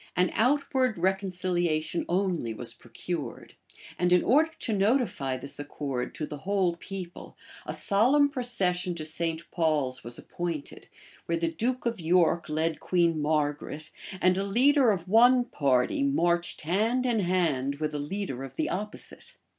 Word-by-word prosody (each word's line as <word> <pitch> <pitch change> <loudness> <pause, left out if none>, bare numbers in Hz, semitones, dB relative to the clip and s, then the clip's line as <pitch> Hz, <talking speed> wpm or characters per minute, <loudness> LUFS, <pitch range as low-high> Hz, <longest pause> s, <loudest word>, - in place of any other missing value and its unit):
An 180 0 +2
outward 255 -1 +1
reconciliation 175 -3 0
only 175 - 0
was 120 +1 -4
procured; 125 +4 -6 0.5
and 180 0 +2
in 180 -1 +5
order 305 +6 +4
to 225 - -1
notify 200 - +1
this 140 +2 -4
accord 140 -3 -4
to 155 - -3
the 150 -1 -8
whole 185 -1 0
people, 180 -1 -8 0.3
a - - -2
solemn 255 +8 +4
procession 195 - 0
to 155 -2 -5
St. 165 +1 0
Paul's 150 -6 0
was 120 0 -3
appointed, 170 -4 -6 0.4
where 170 - 0
the 165 0 -1
duke 245 +10 -2
of 230 -3 -1
York 170 -1 +2
led 160 +1 -1
Queen 170 -3 +1
Margaret, 150 0 -2 0.3
and 185 0 +3
a - - 0
leader 255 +6 +4
of 190 -4 -1
one 245 +5 +5
party 135 - +1
marched 175 -11 +1
hand 220 +10 +1
in 240 -3 +1
hand 165 -8 0
with 155 +1 -3
a 150 - -2
leader 145 -3 -4
of 135 -1 -9
the - - -1
opposite. 210 +2 -6
175 Hz, 150 wpm, -28 LUFS, 155-205 Hz, 0.5 s, in